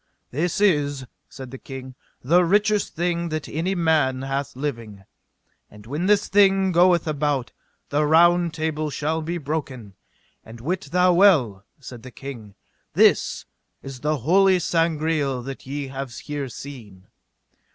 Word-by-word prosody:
This 170 Hz, +9 st, -1 dB
is, 145 Hz, -9 st, +1 dB, 0.2 s
said 130 Hz, -2 st, -10 dB
the 135 Hz, -, -9 dB
king, 130 Hz, -1 st, -9 dB, 0.3 s
the 170 Hz, +7 st, +4 dB
richest 205 Hz, +3 st, +1 dB
thing 170 Hz, 0 st, -1 dB
that 155 Hz, -1 st, -4 dB
any 175 Hz, +5 st, -2 dB
man 155 Hz, -6 st, +1 dB
hath 135 Hz, 0 st, -3 dB
living. 115 Hz, -8 st, -5 dB, 0.7 s
And 105 Hz, 0 st, -15 dB
when 150 Hz, +10 st, -3 dB
this 205 Hz, 0 st, +3 dB
thing 195 Hz, -1 st, +4 dB
goeth 175 Hz, -1 st, +4 dB
about, 145 Hz, -4 st, -1 dB, 0.4 s
the 145 Hz, +1 st, +1 dB
Round 170 Hz, +2 st, +4 dB
Table 155 Hz, -1 st, -2 dB
shall 155 Hz, +3 st, -2 dB
be 170 Hz, +3 st, -3 dB
broken; 135 Hz, -, -5 dB, 0.5 s
and 115 Hz, +1 st, -12 dB
wit 180 Hz, +10 st, -3 dB
thou 180 Hz, +1 st, +4 dB
well, 140 Hz, -, +3 dB
said 125 Hz, -3 st, -10 dB
the 130 Hz, -, -10 dB
king, 120 Hz, -6 st, -10 dB, 0.4 s
this -, -, +3 dB, 0.4 s
is 135 Hz, -2 st, -8 dB
the 150 Hz, +3 st, -1 dB
holy 190 Hz, +3 st, +5 dB
Sangreal 160 Hz, -6 st, 0 dB
that 135 Hz, 0 st, -8 dB
ye 140 Hz, 0 st, -4 dB
have 135 Hz, -1 st, -6 dB
here 140 Hz, +1 st, -5 dB
seen. 110 Hz, -8 st, -11 dB
150 Hz, 140 wpm, -23 LUFS, 130-175 Hz, 0.7 s, holy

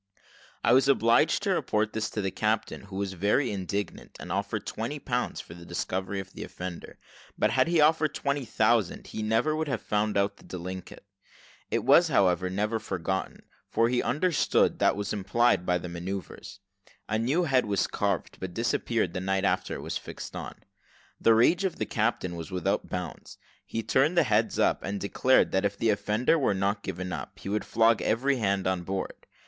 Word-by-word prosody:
I -, -, +4 dB
was 135 Hz, +1 st, +5 dB
obliged 135 Hz, -, +3 dB
to 200 Hz, -, +1 dB
report 110 Hz, -, 0 dB
this 110 Hz, 0 st, -2 dB
to 105 Hz, -, -3 dB
the 95 Hz, -, -1 dB
captain, 110 Hz, -1 st, -1 dB
who 100 Hz, -1 st, -10 dB
was 100 Hz, -1 st, -2 dB
very 105 Hz, +8 st, +1 dB
indignant, 100 Hz, +1 st, -4 dB
and -, -, -7 dB
offered -, -, -2 dB
twenty -, -, -4 dB
pounds -, -, -2 dB
for -, -, -9 dB
the 85 Hz, 0 st, -12 dB
discovery 95 Hz, +3 st, -3 dB
of 95 Hz, -1 st, -8 dB
the -, -, -6 dB
offender; 90 Hz, -1 st, -7 dB, 0.4 s
but -, -, +2 dB
had -, -, +3 dB
he 170 Hz, -1 st, +2 dB
offered 155 Hz, 0 st, +3 dB
twenty 140 Hz, 0 st, -1 dB
thousand 110 Hz, -3 st, +1 dB
he -, -, -6 dB
never 115 Hz, +8 st, +1 dB
would 160 Hz, 0 st, -2 dB
have 130 Hz, -5 st, -1 dB
found 105 Hz, 0 st, 0 dB
out 100 Hz, 0 st, +1 dB
the -, -, -18 dB
delinquent. 90 Hz, +1 st, -7 dB, 0.7 s
It -, -, 0 dB
was, 175 Hz, -, +6 dB
however, 95 Hz, -, +2 dB
never 105 Hz, +4 st, -1 dB
forgotten; 95 Hz, -2 st, -3 dB, 0.3 s
for 115 Hz, +1 st, +2 dB
he 125 Hz, 0 st, +1 dB
understood 160 Hz, +3 st, +1 dB
what -, -, +4 dB
was 100 Hz, 0 st, -3 dB
implied 100 Hz, 0 st, +2 dB
by 90 Hz, 0 st, +3 dB
these 90 Hz, 0 st, -7 dB
manoeuvres. 95 Hz, +3 st, -6 dB, 0.5 s
A 110 Hz, +1 st, 0 dB
new 140 Hz, +10 st, +1 dB
head 130 Hz, -7 st, +2 dB
was 100 Hz, -1 st, +1 dB
carved, 100 Hz, -3 st, -2 dB
but 90 Hz, -2 st, -6 dB
disappeared 115 Hz, -4 st, 0 dB
the 90 Hz, -, -3 dB
night 95 Hz, 0 st, 0 dB
after -, -, 0 dB
it -, -, -6 dB
was -, -, -3 dB
fixed -, -, -8 dB
on. -, -, -6 dB, 0.6 s
The 115 Hz, -, +5 dB
rage 165 Hz, -, +4 dB
of 190 Hz, -3 st, -1 dB
the -, -, -2 dB
captain 105 Hz, -5 st, -1 dB
was 85 Hz, 0 st, -7 dB
without 95 Hz, +2 st, -1 dB
bounds: 90 Hz, -1 st, -6 dB, 0.3 s
he 115 Hz, -, -3 dB
turned 140 Hz, -, +2 dB
the 170 Hz, -, +6 dB
hands 110 Hz, -3 st, +1 dB
up, -, -, +2 dB
and 100 Hz, +1 st, -3 dB
declared 125 Hz, +6 st, +3 dB
that 95 Hz, -, +1 dB
if 100 Hz, 0 st, -1 dB
the 115 Hz, -, +2 dB
offender 110 Hz, +9 st, +1 dB
were 130 Hz, -8 st, +2 dB
not 100 Hz, +2 st, 0 dB
given 90 Hz, 0 st, -5 dB
up, -, -, -6 dB
he -, -, -7 dB
would 105 Hz, +1 st, 0 dB
flog 115 Hz, 0 st, +3 dB
every 135 Hz, +4 st, +1 dB
hand 100 Hz, -4 st, 0 dB
on 95 Hz, -1 st, 0 dB
board. 95 Hz, +2 st, -5 dB
105 Hz, 195 wpm, -28 LUFS, 95-120 Hz, 0.7 s, was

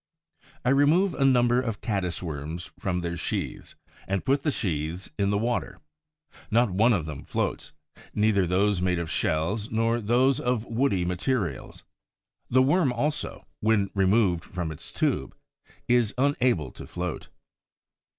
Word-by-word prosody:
I -, -, +3 dB
remove 155 Hz, +8 st, +4 dB
a 140 Hz, -, 0 dB
number 125 Hz, -2 st, +4 dB
of 115 Hz, -5 st, -3 dB
Caddis 95 Hz, -5 st, -2 dB
worms 80 Hz, +1 st, -5 dB
from 90 Hz, -2 st, -1 dB
their 85 Hz, 0 st, -3 dB
sheaths -, -, -4 dB, 0.3 s
and 95 Hz, -1 st, -1 dB
put 135 Hz, +1 st, +2 dB
the 150 Hz, -, 0 dB
sheaths 85 Hz, -, -2 dB
in 100 Hz, 0 st, +2 dB
the 100 Hz, -, +1 dB
water. 115 Hz, -4 st, -1 dB, 0.7 s
Not 115 Hz, -1 st, +3 dB
one 110 Hz, +6 st, +4 dB
of 90 Hz, -9 st, +1 dB
them 75 Hz, -3 st, -7 dB
floats, -, -, -3 dB, 0.4 s
neither 105 Hz, -3 st, +3 dB
those 95 Hz, +1 st, +2 dB
made 90 Hz, -1 st, +1 dB
of 85 Hz, -1 st, -3 dB
shells 85 Hz, +9 st, 0 dB
nor 115 Hz, +1 st, +1 dB
those 125 Hz, +5 st, +3 dB
of 125 Hz, -2 st, -1 dB
woody 115 Hz, -7 st, +1 dB
materials. 90 Hz, -, -2 dB, 0.7 s
The 130 Hz, +1 st, +5 dB
Worm 145 Hz, 0 st, +3 dB
also, 145 Hz, +5 st, -2 dB
when 105 Hz, -3 st, +2 dB
removed 95 Hz, -3 st, +2 dB
from 90 Hz, -3 st, -4 dB
its 80 Hz, -, -9 dB
tube, -, -, -1 dB, 0.5 s
is 120 Hz, -3 st, +2 dB
unable 125 Hz, -, +1 dB
to -, -, -10 dB
float. 90 Hz, -2 st, -4 dB
105 Hz, 145 wpm, -26 LUFS, 90-125 Hz, 0.7 s, The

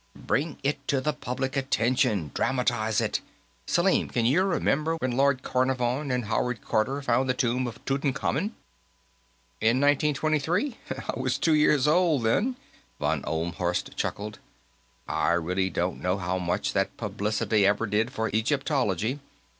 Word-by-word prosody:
Bring 150 Hz, +1 st, -1 dB
it 140 Hz, 0 st, -2 dB
to 140 Hz, -, +2 dB
the 150 Hz, +3 st, 0 dB
public 130 Hz, -1 st, -3 dB
attention; 125 Hz, -, +1 dB
dramatize 120 Hz, -4 st, +1 dB
it. -, -, -1 dB, 0.5 s
Selim, -, -, +2 dB
can 115 Hz, -, 0 dB
you 140 Hz, +10 st, +4 dB
remember 165 Hz, -4 st, +1 dB
when 130 Hz, -6 st, -2 dB
Lord 135 Hz, +1 st, +2 dB
Carnarvon 130 Hz, +2 st, 0 dB
and 125 Hz, -2 st, 0 dB
Howard 120 Hz, +3 st, -1 dB
Carter 135 Hz, +6 st, 0 dB
found 130 Hz, +1 st, +1 dB
the 130 Hz, -, +2 dB
tomb 125 Hz, 0 st, 0 dB
of 115 Hz, -1 st, -7 dB
Tutankhamen?" 140 Hz, -, -1 dB, 1.1 s
"In 115 Hz, +4 st, +3 dB
1923? 155 Hz, -, +1 dB, 0.3 s
I -, -, -3 dB
was 130 Hz, 0 st, 0 dB
two 160 Hz, +3 st, +2 dB
years 150 Hz, -2 st, +4 dB
old, 160 Hz, -5 st, +3 dB
then," 210 Hz, -, +1 dB, 0.4 s
von -, -, 0 dB
Ohlmhorst 85 Hz, +2 st, -2 dB
chuckled. 105 Hz, +1 st, -4 dB, 0.7 s
"I 85 Hz, -, +1 dB
really 90 Hz, +3 st, 0 dB
don't 90 Hz, 0 st, -2 dB
know 90 Hz, +1 st, 0 dB
how 90 Hz, -1 st, -2 dB
much 85 Hz, -1 st, -1 dB
that -, -, -1 dB
publicity 105 Hz, 0 st, 0 dB
ever 105 Hz, +3 st, +2 dB
did 110 Hz, +3 st, 0 dB
for 110 Hz, -2 st, -2 dB
Egyptology. 125 Hz, -, 0 dB
130 Hz, 140 wpm, -27 LUFS, 110-140 Hz, 1.1 s, you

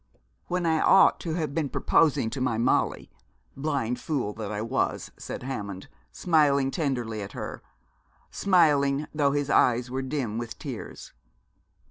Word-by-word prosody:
'When 180 Hz, 0 st, -1 dB
I 160 Hz, -1 st, +2 dB
ought 195 Hz, -, +5 dB
to 160 Hz, -2 st, -3 dB
have 155 Hz, -5 st, -2 dB
been 155 Hz, -3 st, -1 dB
proposing 140 Hz, -8 st, +2 dB
to 135 Hz, -, -4 dB
my 125 Hz, -3 st, 0 dB
Molly, 115 Hz, -, 0 dB, 0.4 s
blind 135 Hz, -5 st, -2 dB
fool 130 Hz, -10 st, -2 dB
that 105 Hz, -2 st, -6 dB
I 105 Hz, -, -3 dB
was,' 115 Hz, +5 st, -2 dB
said -, -, -7 dB
Hammond, 100 Hz, -8 st, -6 dB, 0.2 s
smiling 145 Hz, -5 st, +2 dB
tenderly 120 Hz, -, -2 dB
at 100 Hz, -, -7 dB
her, -, -, -6 dB, 0.7 s
smiling, 150 Hz, -6 st, +3 dB
though 145 Hz, -2 st, +2 dB
his 145 Hz, 0 st, -1 dB
eyes 125 Hz, 0 st, +3 dB
were 130 Hz, +1 st, -2 dB
dim 130 Hz, -5 st, -3 dB
with 120 Hz, -1 st, -6 dB
tears. -, -, -8 dB
135 Hz, 145 wpm, -26 LUFS, 120-155 Hz, 0.7 s, ought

